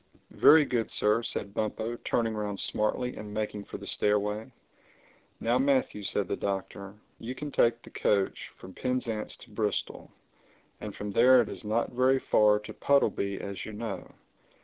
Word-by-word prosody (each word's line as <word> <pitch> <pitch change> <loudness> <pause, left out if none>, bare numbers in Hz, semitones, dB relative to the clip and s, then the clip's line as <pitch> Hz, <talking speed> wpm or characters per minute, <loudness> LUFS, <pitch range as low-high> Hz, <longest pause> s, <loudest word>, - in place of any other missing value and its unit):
"Very 155 0 +7
good, 120 -4 -1
Sir," 105 +2 +2
said 100 -3 -4
Bumpo, 110 +2 -2
turning 115 -2 -1
round 105 -2 -3
smartly 125 +4 -1
and 105 -1 -7
making 105 -1 -3
for - - -7
the - - -10
stairway. 105 +3 0 0.9
"Now 120 +2 +1
Matthew," 135 -5 +1
said 100 -1 0
the - - -1
Doctor, 100 0 -4 0.2
"you 125 +3 -6
can 150 +1 -6
take 120 -2 +2
the - - -13
coach 100 -2 0
from 95 - -11
Penzance 125 -3 -2
to - - -13
Bristol. - - -3 0.7
And 105 -2 -7
from 105 0 -5
there 125 +4 +6
it - - -8
is - - -6
not 110 +2 0
very 130 +2 +3
far 105 -5 +4
to 105 +1 -9
Puddleby, 100 -9 +1
as 100 -1 -6
you 110 - -7
know. 110 -1 -6
110 Hz, 165 wpm, -29 LUFS, 105-125 Hz, 0.9 s, Very